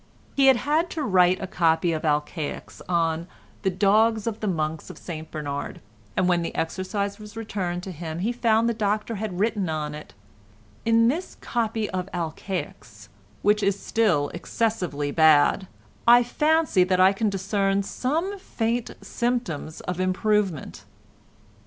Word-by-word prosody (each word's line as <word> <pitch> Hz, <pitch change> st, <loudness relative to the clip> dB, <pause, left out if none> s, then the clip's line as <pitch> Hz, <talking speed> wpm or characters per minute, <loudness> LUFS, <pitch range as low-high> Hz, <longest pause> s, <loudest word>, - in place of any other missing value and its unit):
He 275 Hz, -1 st, +5 dB
had 265 Hz, -2 st, +7 dB
had 310 Hz, +7 st, +1 dB
to 305 Hz, -, 0 dB
write 185 Hz, -5 st, +4 dB
a -, -, -2 dB
copy 170 Hz, -1 st, +2 dB
of 160 Hz, -1 st, -2 dB
Alcaics 150 Hz, 0 st, -2 dB
on 165 Hz, -1 st, 0 dB, 0.3 s
"The 195 Hz, -, +1 dB
dogs 215 Hz, +3 st, +3 dB
of 225 Hz, -2 st, -3 dB
the 215 Hz, -, -3 dB
monks 155 Hz, -3 st, -2 dB
of -, -, -9 dB
St 160 Hz, -2 st, -7 dB
Bernard," 145 Hz, -2 st, -5 dB, 0.4 s
and 185 Hz, -, +3 dB
when 175 Hz, -1 st, +3 dB
the 165 Hz, -, -4 dB
exercise 200 Hz, +4 st, -2 dB
was 210 Hz, +1 st, -11 dB
returned 185 Hz, -5 st, -3 dB
to 190 Hz, -, -6 dB
him 160 Hz, -1 st, -6 dB
he 200 Hz, +7 st, 0 dB
found 230 Hz, -2 st, +2 dB
the 235 Hz, -, +1 dB
Doctor 215 Hz, +1 st, -1 dB
had 195 Hz, -3 st, -4 dB
written 205 Hz, -4 st, 0 dB
on 150 Hz, -1 st, -3 dB
it: 150 Hz, 0 st, -10 dB, 0.7 s
"In 230 Hz, 0 st, +4 dB
this 325 Hz, +9 st, -2 dB
copy 225 Hz, -2 st, -1 dB
of 185 Hz, 0 st, -3 dB
Alcaics—which 155 Hz, -, -3 dB
is 200 Hz, 0 st, +1 dB
still 175 Hz, -11 st, +1 dB
excessively 175 Hz, -7 st, -2 dB
bad—I 170 Hz, +10 st, +4 dB
fancy 300 Hz, -, +2 dB
that 185 Hz, 0 st, +1 dB
I 190 Hz, +1 st, +6 dB
can 215 Hz, +2 st, 0 dB
discern 195 Hz, 0 st, 0 dB
some 330 Hz, -, -2 dB
faint 235 Hz, -, -2 dB
symptoms 235 Hz, -11 st, -2 dB
of 180 Hz, 0 st, -4 dB
improvement." 185 Hz, -2 st, 0 dB
195 Hz, 145 wpm, -25 LUFS, 165-225 Hz, 0.7 s, had